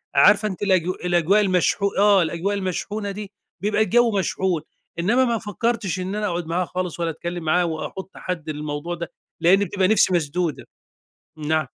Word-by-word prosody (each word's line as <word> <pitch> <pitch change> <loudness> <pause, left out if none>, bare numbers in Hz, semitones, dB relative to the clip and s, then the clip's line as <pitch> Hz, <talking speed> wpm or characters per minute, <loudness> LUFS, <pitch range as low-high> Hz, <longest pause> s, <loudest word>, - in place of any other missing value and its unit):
عارفة 200 +9 +6
أنتِ 190 -3 -6
الأج 185 -4 +3 0.2
الأجواء 175 +4 +3
المشحو 195 +1 +2
آه، 200 -1 +5
الأجواء 170 +5 -1
المشحونة 200 +2 -3
دي 205 0 -7 0.3
بيبقى 210 +2 +1
الجو 235 +1 +3
مشحون، 185 -3 0 0.4
إنما 235 +9 +3
ما 235 -2 +1
فكرتش 210 -2 -2
إن 190 +3 -3
أنا 210 0 -1
أقعد 175 -1 -2
معاها 175 +2 0
خالص 180 -1 -4
ولا 170 -1 0
أتكلم 170 +1 -5
معاها 175 +3 +2
واحط 175 +3 -5
حد 165 -4 -5
للموضوع 150 +3 -4
ده، 170 0 -6 0.3
لإن 185 +4 +5
بتبقى 190 0 +1
نِفسي 210 -3 +4
مسدودة، 170 -1 -1 0.7
نعم؟ 155 0 0
185 Hz, 165 wpm, -23 LUFS, 170-205 Hz, 0.7 s, عارفة